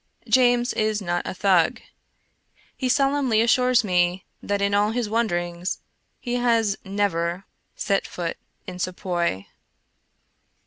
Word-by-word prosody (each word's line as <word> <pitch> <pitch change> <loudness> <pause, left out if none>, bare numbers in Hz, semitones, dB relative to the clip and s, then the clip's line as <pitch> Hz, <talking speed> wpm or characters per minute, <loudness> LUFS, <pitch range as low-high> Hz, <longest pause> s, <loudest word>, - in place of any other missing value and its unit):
James 245 -1 +3
is 215 -1 0
not 175 -3 -2
a - - -3
Thug. 185 -4 +2 1.0
He 260 - -2
solemnly 275 -4 +2
assures 250 +2 +3
me 180 -2 +1 0.2
that 205 0 -1
in 200 0 0
all 205 +1 +3
his 235 0 -1
wanderings 175 -5 -1 0.4
he 245 0 -2
has 230 -4 +2
never 190 -2 -1 0.3
set 200 -2 0
foot 170 -2 -4 0.3
in 180 -1 -8
Sepoy. 175 - -2
205 Hz, 120 wpm, -24 LUFS, 180-240 Hz, 1.0 s, James